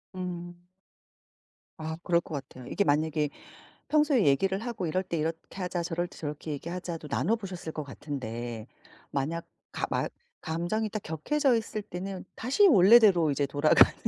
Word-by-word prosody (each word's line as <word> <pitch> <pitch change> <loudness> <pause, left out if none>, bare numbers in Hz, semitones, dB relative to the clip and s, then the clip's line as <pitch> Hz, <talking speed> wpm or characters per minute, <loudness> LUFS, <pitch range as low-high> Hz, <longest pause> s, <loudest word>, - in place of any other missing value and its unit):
음. 175 -1 -5 1.2
아 160 0 -4
그럴 170 -1 +3
거 - - -10
같아요. 130 -2 -8
이게 200 - +1
만약에 150 -1 +1 0.6
평소에 295 -7 +4
얘기를 190 +8 +3
하고 225 -6 -3
"이럴 185 +4 0
때 170 - -3
이렇게 160 +1 -1 0.2
하자. 180 -1 -2
저럴 175 +1 -1
때 - - -15
저렇게 150 0 -5
얘기하자."도 170 +1 -5
나눠보셨을 190 -6 -1
것 155 - -3
같은데, 120 -5 -5 0.4
만약 155 +5 -2 0.3
가마 - - -1 0.3
감정이 175 +7 -1
딱 215 -1 -4
격해져 255 - +1
있을 220 -1 -2
때는 190 0 -6
다시 275 - +4
원래대로 195 - +7
이제 140 +1 +1
돌아가는 145 +2 +5
170 Hz, 325 characters per minute, -29 LUFS, 150-195 Hz, 1.2 s, 원래대로